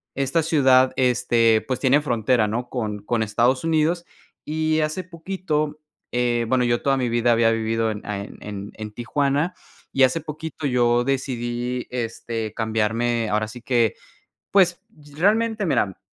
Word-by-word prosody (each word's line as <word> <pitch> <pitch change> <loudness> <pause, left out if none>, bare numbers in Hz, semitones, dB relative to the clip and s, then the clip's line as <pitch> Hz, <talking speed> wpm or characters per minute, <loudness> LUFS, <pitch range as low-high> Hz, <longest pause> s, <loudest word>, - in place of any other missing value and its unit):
esta 140 +4 +1
ciudad, 130 -5 +4
este, 120 -3 +3
pues 130 - -1
tiene 140 +2 +4
frontera, 120 -4 +1
¿no? 120 +4 -3
Con 110 -5 -3
con 115 0 0
Estados 120 +6 +1
Unidos 165 +2 +1 0.4
y 155 0 0
hace 155 +4 -2
poquito, 165 -4 -3 0.3
eh, 120 -1 +1
bueno, 125 -1 +2
yo 120 0 +1
toda 135 -1 +2
mi 125 -2 0
vida 120 +1 +2
había 115 0 +4
vivido 115 0 0
en 105 - -6
en 100 0 -6
en 105 -1 -7
Tijuana 140 +8 0 0.4
y 135 - +4
hace 130 +5 +3
poquito 155 0 -7
yo 120 -1 +2
decidí, 125 -2 -2
este, 115 -2 -4
cambiarme, 115 +1 0
ahora 110 +1 0
sí 120 +2 -10
que, 120 -4 +2 0.6
pues, 180 -3 +3 0.3
realmente 215 +4 +2
mira 95 - 0
125 Hz, 145 wpm, -23 LUFS, 115-150 Hz, 0.6 s, ciudad